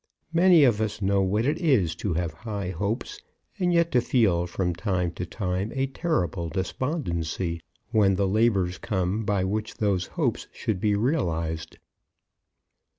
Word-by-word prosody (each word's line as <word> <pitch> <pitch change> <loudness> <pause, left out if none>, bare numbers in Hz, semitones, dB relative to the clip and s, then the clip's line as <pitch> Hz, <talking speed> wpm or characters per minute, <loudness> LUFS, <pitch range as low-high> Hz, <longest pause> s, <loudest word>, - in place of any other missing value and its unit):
Many 170 -2 +6
of 115 -5 +3
us 110 -1 -2
know 100 -1 +2
what 105 +4 +1
it 150 +4 +1
is 125 - +2
to 95 -6 -2
have 85 -2 -1
high 100 0 -4
hopes, 105 - -3 0.4
and 180 -1 +2
yet 170 -1 +3
to 125 - +4
feel 95 -9 +2
from 90 0 -1
time 90 -1 -1
to 90 +1 -5
time 95 +2 -2
a 135 0 +1
terrible 95 - -1
despondency 85 - -2 0.3
when 100 -4 +4
the 100 0 +1
labours 95 -3 +2
come 95 +2 -1
by 100 -3 +1
which 105 +3 -2
those 100 -4 0
hopes - - 0
should 105 -4 -2
be 105 +1 +2
realized. 85 - -1
100 Hz, 155 wpm, -26 LUFS, 90-120 Hz, 0.4 s, Many